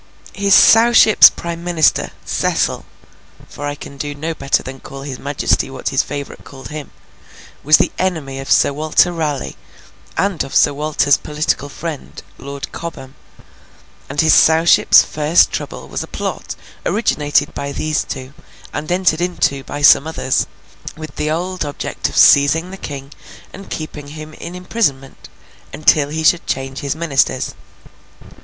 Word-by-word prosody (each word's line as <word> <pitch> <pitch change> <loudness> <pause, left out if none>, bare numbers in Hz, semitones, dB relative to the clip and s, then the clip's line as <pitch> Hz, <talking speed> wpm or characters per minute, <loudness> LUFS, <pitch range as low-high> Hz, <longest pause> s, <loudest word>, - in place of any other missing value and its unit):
His 200 -1 +3
Sowship's 225 -1 +7
prime 170 0 -7
Minister, 170 -3 +2 0.2
Cecil - - -1 0.6
(for 145 - -7
I 145 - -3
cannot 140 -1 -11
do 145 0 -4 0.2
better 140 -3 0
than 135 +1 -8
call 135 +1 -10
his 135 -3 -7
majesty 140 -1 -1
what 135 -1 -4
his 135 - +2
favourite 140 -1 -7
called 135 -1 -11
him), 150 -2 -7 0.7
was 155 +2 +6
the - - +1
enemy 155 -8 -2
of 135 - -8
Sir - - +3
Walter 155 +4 +2
Raleigh, 150 -5 -3 0.6
and 200 -3 0
also - - -7
of - - -9
Sir 145 - +4
Walter's 145 -1 +1
political 150 -2 -2
friend, 155 0 -7 0.2
Lord 140 +1 -7
Cobham; 135 -6 -8 1.0
and 140 +2 0
his 160 - +4
Sowship's 160 +2 +5
first 155 +3 +2
trouble - - -6
was - - -4
a - - -6
plot - - -5 0.3
originated 150 -7 0
by 140 0 -5
these 155 +2 -1
two, 130 +1 -8 0.4
and 155 +4 -5
entered 180 -3 +1
into 170 -6 0
by 145 0 -6
some 145 +1 +6
others, 160 -5 -1 0.5
with 155 -2 -9
the 150 - -1
old 180 +3 -2
object 145 -1 -4
of - - -7
seizing 155 +5 +5
the - - -7
King 140 -4 -8 0.4
and 195 - -11
keeping 150 -2 -7
him 155 +1 -10
in 170 +3 -9
imprisonment 180 -8 -3 0.4
until 150 -1 +2
he 160 +1 -3
should 170 +2 +2
change 135 0 -3
his 140 0 -3
ministers. 140 -5 0
150 Hz, 150 wpm, -17 LUFS, 140-165 Hz, 1.0 s, Sowship's